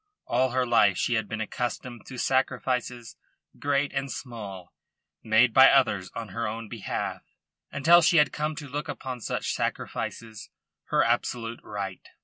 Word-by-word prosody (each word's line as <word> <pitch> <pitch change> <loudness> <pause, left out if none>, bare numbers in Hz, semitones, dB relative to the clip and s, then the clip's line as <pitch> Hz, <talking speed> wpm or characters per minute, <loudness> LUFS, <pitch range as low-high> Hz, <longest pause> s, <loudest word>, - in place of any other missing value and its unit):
All 130 +2 +2
her 130 +1 +1
life 105 -5 +4
she 120 - 0
had 110 -2 0
been 110 -1 -4
accustomed 120 +1 -4
to 130 - -8
sacrifices 125 -2 -1 0.4
great 145 0 0
and 135 -1 -2
small 100 -8 -8 0.5
made 110 +2 +4
by 130 0 +9
others 110 -9 +3
on 115 -2 -5
her 115 -1 -3
own 115 +1 -5
behalf, 110 -3 -4 0.5
until 165 +5 +6
she 170 +1 +4
had 150 - +4
come 150 +1 -2
to 145 -1 -7
look 145 +3 -4
upon 130 -3 -5
such - - -2
sacrifices 110 -2 -4 0.4
her - - +2
absolute 120 0 -1
right. 100 -3 -6
120 Hz, 150 wpm, -27 LUFS, 110-135 Hz, 0.5 s, by